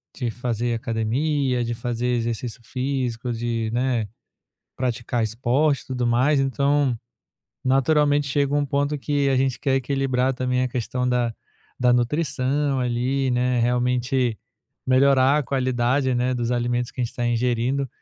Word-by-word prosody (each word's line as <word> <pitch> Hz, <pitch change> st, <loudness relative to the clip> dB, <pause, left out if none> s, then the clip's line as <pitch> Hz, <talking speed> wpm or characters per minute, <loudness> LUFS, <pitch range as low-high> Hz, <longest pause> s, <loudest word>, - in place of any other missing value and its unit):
de 125 Hz, -3 st, -2 dB
fazer 120 Hz, 0 st, -2 dB
academia, 125 Hz, +4 st, 0 dB
de 120 Hz, -, -2 dB
fazer 120 Hz, +1 st, -3 dB
exercício 120 Hz, 0 st, -2 dB
físico, 125 Hz, -1 st, -2 dB
de, 115 Hz, -1 st, -2 dB
né, 120 Hz, -3 st, 0 dB, 0.7 s
praticar 120 Hz, -1 st, -1 dB
esporte 130 Hz, +6 st, +1 dB
e -, -, -21 dB
tudo 125 Hz, -2 st, -2 dB
mais, 130 Hz, +5 st, +3 dB
então 140 Hz, -1 st, +1 dB, 0.7 s
naturalmente 145 Hz, +2 st, +3 dB
chega 140 Hz, 0 st, +1 dB
um 145 Hz, 0 st, +2 dB
ponto 140 Hz, +2 st, 0 dB
que 145 Hz, 0 st, 0 dB
a 135 Hz, -, +2 dB
gente 130 Hz, -2 st, +1 dB
quer 135 Hz, -, +1 dB
equilibrar 135 Hz, -1 st, 0 dB
também 125 Hz, 0 st, 0 dB
a 130 Hz, -, 0 dB
questão 125 Hz, +1 st, -2 dB
da 120 Hz, -2 st, 0 dB, 0.4 s
da 125 Hz, -1 st, +4 dB
nutrição 135 Hz, +2 st, 0 dB
ali, 125 Hz, +2 st, 0 dB
né, 125 Hz, 0 st, +1 dB
realmente 125 Hz, 0 st, +1 dB, 0.5 s
melhorar 135 Hz, +1 st, +4 dB
a -, -, +1 dB
qualidade, 130 Hz, 0 st, 0 dB
né, 125 Hz, +1 st, +1 dB
dos 120 Hz, -1 st, -2 dB
alimentos 120 Hz, 0 st, -1 dB
que 125 Hz, -, -7 dB
a -, -, +2 dB
gente 115 Hz, -, -6 dB
tá 120 Hz, -, -1 dB
ingerindo. 125 Hz, +3 st, 0 dB
125 Hz, 145 wpm, -23 LUFS, 120-135 Hz, 0.7 s, da